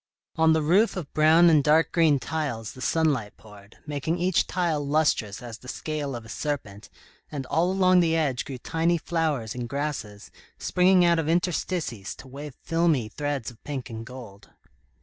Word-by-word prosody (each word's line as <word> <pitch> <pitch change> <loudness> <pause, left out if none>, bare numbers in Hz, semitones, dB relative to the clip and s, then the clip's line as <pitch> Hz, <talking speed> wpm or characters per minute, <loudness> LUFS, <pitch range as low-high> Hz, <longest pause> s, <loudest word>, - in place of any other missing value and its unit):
On 160 0 +4
the 160 -1 +1
roof 190 +8 +3
of 160 -6 -6
brown 160 +3 +6
and 155 -4 +5
dark 155 +2 +3
green 160 -4 +4
tiles, 135 -8 -3
the 130 - -12
sunlight 140 -8 0
poured, 105 -1 -16
making 150 +3 -2
each 180 +1 +1
tile 170 -5 0
lustrous 140 -8 0
as 120 -2 -8
the 125 - -14
scale 145 -1 -4
of 120 -1 -8
a - - -12
serpent, 110 -7 -5 0.4
and 140 -3 -4
all 170 +7 +1
along 185 -1 +4
the 165 -2 +2
edge 145 -7 0
grew 135 - -7
tiny 165 +6 0
flowers 155 -8 -1
and 120 -1 -5
grasses, 140 -8 -4 0.3
springing 180 0 +3
out 170 -1 +3
of 160 -1 -1
interstices 170 - -1
to 135 - -13
wave 140 +1 -9
filmy 165 -9 +1
threads 145 -1 -3
of 115 - -21
pink 135 -4 -5
and 115 0 -7
gold. 110 -6 -11
150 Hz, 175 wpm, -26 LUFS, 125-165 Hz, 0.4 s, brown